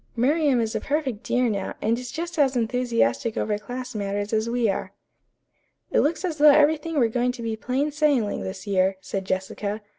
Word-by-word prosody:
"Miriam 280 +2 +2
is 225 -1 -1
a - - -1
perfect 275 -7 -2
dear 250 0 +1
now, 200 -4 -2
and 230 +2 0
is 250 -1 -7
just 340 0 -5
as 270 -2 +3
enthusiastic 230 - 0
over 210 -1 -1
class 250 +3 -6
matters 205 0 -3
as 220 +1 +1
we 240 -1 +1
are." 195 -1 -2 1.0
"It - - +3
looks 330 +5 +1
as 320 -4 -3
though 300 +1 +8
everything 305 +2 +3
were 240 -4 +4
going 245 +2 0
to 240 -2 -8
be 225 -1 -2
plain 260 +6 -1
sailing 285 -8 +1
this 190 +2 -6
year," 190 -1 +1
said 190 +1 -4
Jessica. 195 +3 -3
240 Hz, 190 wpm, -24 LUFS, 210-280 Hz, 1.0 s, though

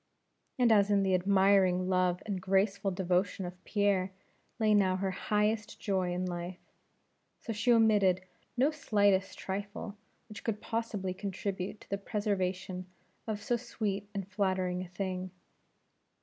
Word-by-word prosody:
And 245 -3 +4
as 205 -2 +5
in 200 -1 +3
the 190 -1 +2
admiring 190 -1 +4
love 185 -1 +1
and 195 -4 -3
graceful 195 +1 +1
devotion 185 0 0
of 180 +1 -9
Pierre 200 -3 +1 0.5
lay 215 -1 +3
now 190 -3 +4
her 190 0 -1
highest 210 +3 0
joy 190 -3 0
in 180 +1 -1
life; 175 0 -4 0.8
so 225 - -4
she 230 +4 +2
omitted 210 -5 +4 0.4
no 270 +5 +4
slightest 205 -10 +2
trifle 200 +1 -5 0.3
which 210 -2 -10
could 215 -2 -2
possibly 220 -5 -2
contribute 195 0 -4
to - - -16
the 200 - -1
preservation 190 -3 -2 0.4
of 210 -1 -3
so 240 -3 +1
sweet 210 -4 -3
and 195 -2 -3
flattering 185 -2 0
a 185 - -6
thing. 185 0 -4
195 Hz, 140 wpm, -31 LUFS, 185-210 Hz, 0.8 s, as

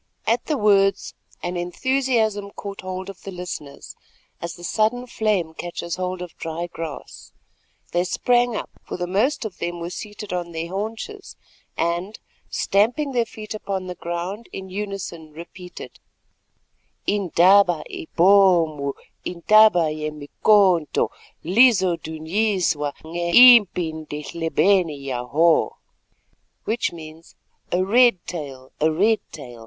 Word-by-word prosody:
At 230 +2 +1
the 305 - -1
words 195 -3 +2 0.3
an 175 +1 -3
enthusiasm 220 +2 0
caught 200 -1 -7
hold 185 0 -6
of 195 -2 -10
the - - -8
listeners, 180 -6 -8 0.5
as 170 -1 -5
the 175 - -13
sudden 220 +7 0
flame 210 -9 -1
catches 170 0 -5
hold 185 0 -3
of 175 - -10
dry 165 +1 -4
grass. 165 -3 -8 0.6
They 175 +1 +1
sprang 245 +4 +1
up, - - -5
for - - -6
the 180 - -2
most 225 +9 0
of 205 -5 -7
them 175 0 -3
were 170 +1 -5
seated 210 +1 -7
on 175 -1 -4
their 165 +1 -4
haunches, 225 - -6 0.4
and 175 +5 -2 0.3
stamping 245 +9 +1
their 240 -3 0
feet 215 0 -8
upon 195 -3 -4
the 180 - -5
ground 175 +6 -5
in 190 0 -7
unison, 190 -6 -6
repeated:— 180 +3 -11 1.1
Indaba 185 -2 +4
ibomwu—indaba 175 +1 +3
ye 155 0 -3
mikonto 165 +3 +2 0.3
Lizo 190 -2 +5
dunyiswa 160 -2 -1
nge 170 +1 -3
impi 210 -10 +7
ndhlebeni 160 +2 0
yaho. 135 +6 +1 2.0
(A 185 +1 +1
red 240 +1 +5
tale! 135 -6 -7
A 155 +1 +3
red 210 +7 +2
tale! 125 -6 -10
180 Hz, 115 wpm, -22 LUFS, 165-210 Hz, 2.0 s, impi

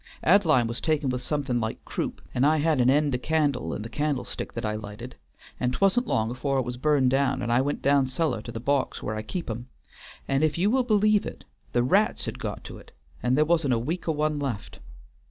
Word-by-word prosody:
Ad'line 160 - +4
was 115 +1 -3
taken 155 -4 +1
with 125 0 -3
something 140 -3 -1
like 110 -1 -4
croup, - - -4
and 125 - +1
I 155 +2 +4
had 155 -3 +2
an 125 - +4
end 145 +1 +3
o' 125 - 0
candle 145 - 0
in 105 - -5
the - - -5
candlestick 135 -2 -3
that 115 -1 -4
I 105 - -1
lighted, 110 +3 -7 0.4
and 125 0 0
't - - -3
wa'n't 195 +6 +3
long 110 +1 0
afore 135 +2 -1
it 130 - 0
was 125 0 -5
burnt 140 -1 +3
down, 135 0 +1
and 120 - 0
I 120 - +4
went 145 +2 -2
down 140 -1 +4
cellar 130 -3 -1
to 120 - -8
the 115 - -5
box 140 +3 -1
where 105 - -2
I 110 - -3
kep' 170 +11 -5
'em, 120 +3 -6 0.6
and 135 +2 +1
if 155 0 +1
you 195 +5 +2
will 260 +1 +3
believe 215 -2 +3
it, - - -9 0.3
the 120 - +3
rats 195 +12 +2
had - - -5
got - - -5
to - - -9
it, - - -17 0.3
and 125 +2 +1
there 150 - +4
wasn't 160 -6 +2
a - - +1
week 160 +11 -3
o' - - +2
one 150 0 0
left. 130 -8 -4
135 Hz, 240 wpm, -26 LUFS, 120-155 Hz, 0.6 s, Ad'line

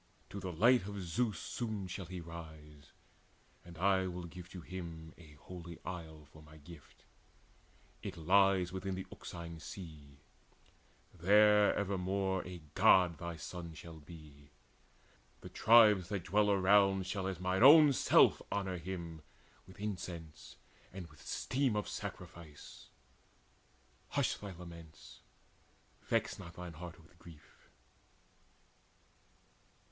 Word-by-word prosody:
To 100 - -5
the 95 -1 -5
light 115 +5 +4
of 100 -1 -6
Zeus 105 +6 -1
Soon 110 -5 -4
shall 90 0 -6
he 90 0 -6
rise; 80 -3 -11 0.7
and 85 -1 -13
I 95 +1 +2
will 90 0 -5
give 85 +1 -10
to 90 - -9
him 85 -3 -8
A 80 -3 -16
holy 85 +2 -10
island 80 -4 -8
for 80 - -16
my 75 0 -15
gift: 75 0 -15 1.0
it - - -6
lies 95 +1 +3
Within 95 0 -4
the 95 - -5
Euxine 85 -1 -8
Sea: 75 -6 -10 1.0
there 105 +3 +5
evermore 95 -1 -1
A 90 -3 -9
God 90 -4 +5
thy 85 -1 -5
son 85 0 -8
shall 80 +1 -10
be. 75 -2 -14 0.9
The - - -9
tribes 105 -5 +5
that 100 -4 -3
dwell 105 +2 +2
Around 95 -1 +4
shall 95 0 -3
as 95 -3 -4
mine 95 +2 0
own 145 +2 +9
self - - +5
honour 95 -3 -2
him 85 -2 -6 0.5
With 95 0 -15
incense 85 -6 -6 0.4
and 95 -2 -7
with 75 - -18
steam 130 -4 -1
of 105 - -2
sacrifice. 80 -4 -9 1.2
Hush - - 0
thy 100 -2 -8
laments, 85 -3 -12 0.8
vex - - -1
not 85 -1 -10
thine 90 -1 -8
heart 85 +1 -9
with 80 +2 -21
grief." 80 -4 -17
90 Hz, 125 wpm, -34 LUFS, 80-95 Hz, 1.2 s, own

